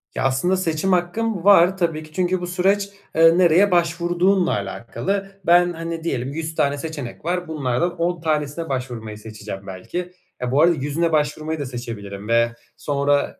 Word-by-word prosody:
Ya, - - -1
aslında 135 +8 +2
seçim 170 +1 0
hakkım 185 +2 0
var 190 -2 +6
tabii 165 -4 -1
ki. 155 - -15
Çünkü 185 +1 0
bu 175 - -3
süreç, 195 +3 +1 0.3
eee, 165 +1 +6
nereye 185 +3 +5
başvurduğunla 175 +2 +2
alakalı. 120 - -3
Ben, 175 0 +5
hani, 165 0 -5
diyelim, 135 -4 -2
100 160 +1 -4
tane 140 0 +1
seçenek 145 -4 -6
var. 180 +1 -1
Bunlardan 155 +2 -1
10 170 0 -1
tanesine 155 0 -1
başvurmayı 120 -5 -4
seçeceğim 105 -2 -8
belki. 175 - -5 0.3
Eee, 125 -1 -2
bu 140 +3 +4
arada 170 +1 +5
100'üne 155 +4 -1
başvurmayı 155 +1 0
da 145 - -3
seçebilirim 105 -5 -7
ve 115 0 +3 0.3
sonra 145 0 0
160 Hz, 160 wpm, -22 LUFS, 130-175 Hz, 0.3 s, var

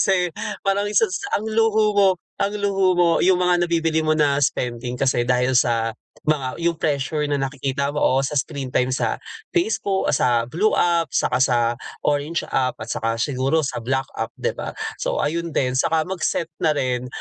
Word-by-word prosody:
Kasi 180 -3 +2 0.3
parang 200 +1 +1
isa 210 - +3
sa 405 +2 -2
ang 210 - -4
luho 220 -1 +2
mo 200 -1 +5 0.3
ang 205 +1 0
luho 195 -2 +2
mo 175 -1 +5
yung 185 0 +4
mga 175 -1 +2
nabibili 165 -1 +1
mo 155 0 +2
na 145 -2 +3
spending 125 -1 -1
kasi 130 -3 +2
dahil 125 +1 +1
sa 115 -2 +2 0.3
mga 140 -3 0
yung 170 0 +1
pressure 150 -1 -1
na 145 - +1
nakikita 140 +1 -2
mo, 150 - -1
oo, 130 - +3
sa 135 +2 -1
screen 140 -1 -2
time 125 0 0
sa 130 - 0 0.4
Facebook, 345 - +1
ah, - - +2
sa - - +2 0.2
blue 205 +9 +2
app, 170 -1 +2
saka 125 - +1
sa 130 -1 +3 0.5
orange 150 +3 0
app 130 -1 +1
at 115 - -7
saka 115 0 -1
siguro 135 +6 0
sa 135 - -3
black 130 +3 -1
app, - - -3
di - - -1
ba? - - -6 0.2
So, - - -1
ayun 170 +1 -2
din, 130 -1 +1
saka 160 +3 +2
mag-set 170 -1 -2
na 155 -2 +2
rin, 125 -3 -1
150 Hz, 190 wpm, -22 LUFS, 130-180 Hz, 0.5 s, mo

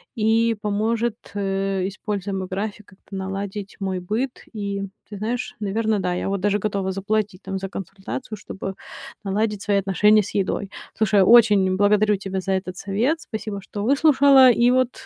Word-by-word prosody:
и 225 0 +2
поможет, 220 +2 0 0.2
э, 195 -1 -1
используя 200 0 -4
мой 190 -1 -3
график, 205 +2 -4
как-то 195 0 -13
наладить 195 +1 -5
мой 190 -2 -2
быт. 225 +8 -3
И, 200 -2 -3 0.3
ты 205 - -7
знаешь, 235 +5 -3
наверно, 215 +1 0
да. 180 -1 -1
Я 180 - -2
вот 200 0 -1
даже 205 +1 +1
готова 200 -2 -1
заплатить 200 0 -2
там 195 0 -4
за 190 0 -5
консультацию, 195 +4 -6
чтобы 195 0 -6 0.5
наладить 210 +1 -1
свои 205 -1 +1
отношения 210 +2 +4
с 195 - -8
едой. 195 0 -1 0.3
Слушай, 210 -2 +3
очень 205 -4 +6
благодарю 210 +1 +4
тебя 190 0 -4
за 195 +1 -1
этот 185 -1 -3
совет. 235 - 0
Спасибо, 215 -5 -5
что 205 +1 -6
выслушала 275 0 +6
и 240 +1 +3
вот 255 -1 0
205 Hz, 165 wpm, -23 LUFS, 195-220 Hz, 0.5 s, очень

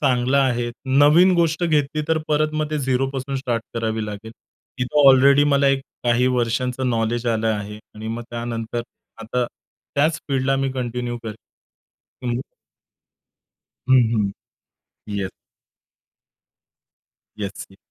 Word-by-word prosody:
चांगला 130 -1 +2
आहे, 120 -2 0 0.3
नवीन 155 +6 +6
गोष्ट 170 0 +1
घेतली 155 -2 +1
तर 160 - +2
परत 155 0 +1
मग 155 0 -1
ते 155 - -1
झीरोपासून 135 0 -1
स्टार्ट 120 -4 -2
करावी 110 -1 -1
लागेल. 105 +2 -7 0.5
तिथं 135 +3 +4
ऑलरेडी 140 +2 +6
मला 140 0 +4
एक 135 0 +2 0.2
काही 120 +1 +3
वर्षांचं 125 +1 0
नॉलेज 115 +1 -1
आलं 115 -1 +1
आहे 105 0 -5 0.2
आणि 110 +1 -7
मग 115 +1 -4
त्यानंतर 115 0 -4 0.4
आता 125 +2 -1 0.5
त्याच 155 +3 +2
फील्डला 135 0 +1
मी 135 0 0
कंटिन्यू 120 -1 -3
करेल. 110 -2 -5 0.9
हं. 120 0 -1 1.5
हं, 130 - +7
हं. 105 -3 +1 0.8
येस. 100 -2 -3 2.1
येस, 100 -1 -5
ये 95 - -18
125 Hz, 125 wpm, -22 LUFS, 115-140 Hz, 2.1 s, हं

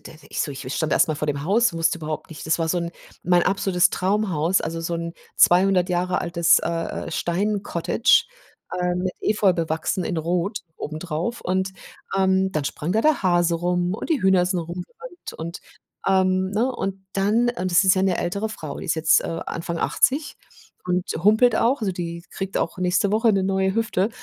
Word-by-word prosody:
d - - -12 0.2
ich - - -3
so - - -1
ich 135 -1 -6
stand 160 -2 -1
erst - - +4
mal 155 - -1
vor 150 +1 -3
dem 145 -1 -2
Haus, 225 +3 +3
wusste 165 0 0
überhaupt 155 -1 -5
nicht 155 - -9
das 160 - +1
war 165 - 0
so 175 - +1
'n 170 -1 -3 0.3
mein 175 -1 +3
absolutes 190 -2 +2
Traumhaus, 185 -3 +1
also, 165 +1 -4
so 170 +1 -3
'n 170 0 -4 0.2
200 180 0 +4
Jahre 180 0 0
altes, 170 -1 +3
äh, - - -3 0.4
äh, - - -6
Steincottage, 200 +4 +1 0.6
ähm, 180 +1 0
Efeu 210 -3 +2
bewachsen, 165 +1 -1
in 175 - -3
Rot 175 +5 -1 0.2
obendrauf. 160 +8 -4
Und, 190 +1 -1 0.4
ähm, 190 0 +2
dann 155 -5 -2
sprang 150 +3 -3
da 215 +4 +2
der 310 -6 +2
Hase 175 -2 +2
rum 175 +2 0
und 275 - -6
die 300 - +2
Hühner 190 -2 +4
sind 185 -1 0
rumgerannt 180 - -8
und, 170 +2 -6 0.5
ähm, 185 0 +2
ne? 235 +6 0
Und 195 0 -4
dann 215 +5 +2
und 185 -6 -3
das 175 +3 +4
ist 190 - +5
ja 185 - +1
'ne 190 -2 +1
ältere 200 +5 -2
Frau, 155 -9 -7
die - - -7
ist 165 - 0
jetzt, 160 0 +4
äh, 165 - -4
Anfang 170 0 -4
80 290 - +1 0.5
und 180 0 +1 0.2
humpelt 220 +2 +5
auch, 245 +3 +2
also, 195 -3 -1
die 170 -1 -5
kriegt 195 0 -5
auch 165 - -2
nächste 185 +3 +1
Woche 220 0 +3
'ne 195 -1 +1
neue 190 0 0
Hüfte. 220 -3 0
180 Hz, 195 wpm, -23 LUFS, 170-195 Hz, 0.6 s, ist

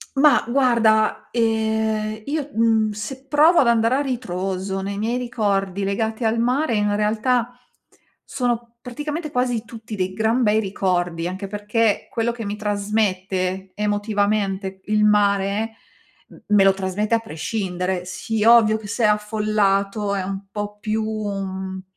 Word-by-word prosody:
Ma 290 +2 +5
guarda, 235 -4 +2
ehm, 220 -1 0
io, 290 +1 -3
mhmm, 225 -1 +2
se 255 +6 -7
provo 310 +5 +5
ad 250 - +3
andare 230 +1 +3
a - - +1
ritroso 195 -7 -3
nei 200 +1 -4
miei 225 +4 -1
ricordi 200 -5 -1
legati 220 +4 -2
al 225 +1 +1
mare 250 +2 +1
in 205 -1 +1
realtà 230 +3 0 0.7
sono 240 -2 -3
praticamente 295 +6 -5
quasi 250 -3 0
tutti 225 -1 -9
dei 185 -2 -2
gran 220 +4 +1
bei 215 -1 +3
ricordi, 180 -4 -1
anche 190 +2 -5
perché 210 +2 0
quello 235 +1 0
che 235 -1 -7
mi 205 +1 -3
trasmette 195 -3 -1
emotivamente 205 -2 -1
il 210 0 +2
mare 205 +1 +2 0.6
m - - -14
me 205 -2 +5
lo 195 0 +5
trasmette 195 +3 -1
a - - +4
prescindere. 180 -1 -3
Sì 210 +4 -3
ovvio 225 -2 +6
che 220 -1 -9
se 230 +3 -1
è - - +7
affollato 210 -1 +1
è 195 - -1
un 195 +1 -5
po' 205 0 -5
più, 215 +1 -1
mhmm, 195 -3 -4
215 Hz, 145 wpm, -22 LUFS, 195-230 Hz, 0.7 s, è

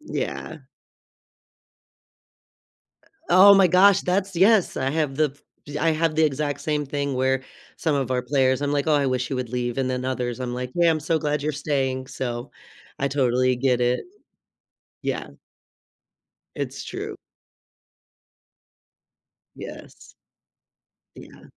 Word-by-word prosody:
Yeah. 300 - -5 2.5
Eh, - - -26 0.2
oh 195 +3 +8
my 195 -1 +6
gosh, 185 +3 +5
that's 190 +1 -1
yes, 195 +2 +4
I 130 +1 0
have 150 -3 -1
the 155 -1 +2 0.4
f 145 0 -7
I 165 +1 +3
have 160 0 0
the 160 +1 +3
exact 145 -1 -1
same 150 -1 -1
thing 140 0 -2
where 130 +1 +1 0.3
some 160 -3 0
of 135 -3 -1
our 125 -1 0
players 130 +1 +1
I'm 145 - 0
like, 145 0 0
"Oh, 155 - +3
I 145 -2 +2
wish 125 -1 -1
he 135 - -3
would 125 -2 -4
leave," 120 0 -2
and 130 - 0
then 125 0 -3
others, 125 -1 -3
I'm 125 -1 -3
like, 125 0 -4
"Yeah, 170 -1 +4
I'm 155 - 0
so 160 +2 0
glad 150 -2 -1
you're 155 - -1
staying," 135 -3 -2
so 125 -1 -5 0.5
I 140 - 0
totally 130 -2 +2
get 125 -1 +1
it. 125 0 +1 1.0
Yeah. - - -3 1.3
It's - - -5
true. - - -6 2.4
Yes. - - -11 1.0
Yeah. - - -14
140 Hz, 140 wpm, -24 LUFS, 130-155 Hz, 2.5 s, oh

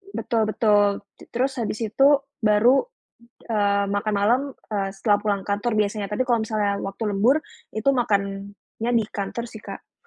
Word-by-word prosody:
Betul 225 -3 0
betul. 205 -2 +2 0.2
T - - -14
terus 260 +2 -1
habis 215 -1 -2
itu 245 +6 +3 0.3
baru, 225 - +4 0.7
eee, 200 -2 +2
makan 205 +1 -1
malam, 225 +6 +3 0.3
eee, 195 -1 0
setelah 205 +1 +2
pulang 200 -2 0
kantor 205 +3 -1
biasanya, 205 0 -1
tapi 215 +5 0
kalau 235 -2 +3
misalnya 210 -2 0
waktu 195 +3 -6
lembur 230 +9 +4 0.4
itu 220 +5 0
makannya 200 -1 -2
di 220 - 0
kantor 210 +4 -4
sih 220 - -10
Kak. - - -12
210 Hz, 155 wpm, -23 LUFS, 200-235 Hz, 0.7 s, baru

